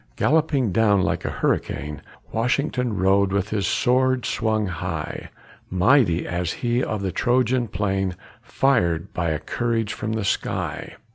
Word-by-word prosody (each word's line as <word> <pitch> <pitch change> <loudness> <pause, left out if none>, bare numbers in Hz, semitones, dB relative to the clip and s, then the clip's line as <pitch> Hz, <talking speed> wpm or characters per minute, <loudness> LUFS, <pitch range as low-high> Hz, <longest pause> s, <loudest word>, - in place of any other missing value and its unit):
Galloping 145 - +2
down 100 -1 +3
like - - -1
a - - 0
hurricane 75 0 -2 0.3
Washington 125 - 0
rode 95 +1 +3
with 100 +1 0
his 100 -4 -1
sword 130 0 +2
swung 110 -2 0
high, 85 -5 -4 0.4
Mighty 95 -2 +3
as 85 -1 -2
he 120 +1 0
of 105 -2 -3
the 95 - -1
Trojan 125 +4 +1
plain 95 -3 -1 0.3
Fired 110 -10 +1
by 85 -2 -1
a 80 - 0
courage 115 +7 -2
from 110 +1 -3
the 110 -2 -2
sky. - - -2
110 Hz, 140 wpm, -23 LUFS, 95-125 Hz, 0.4 s, down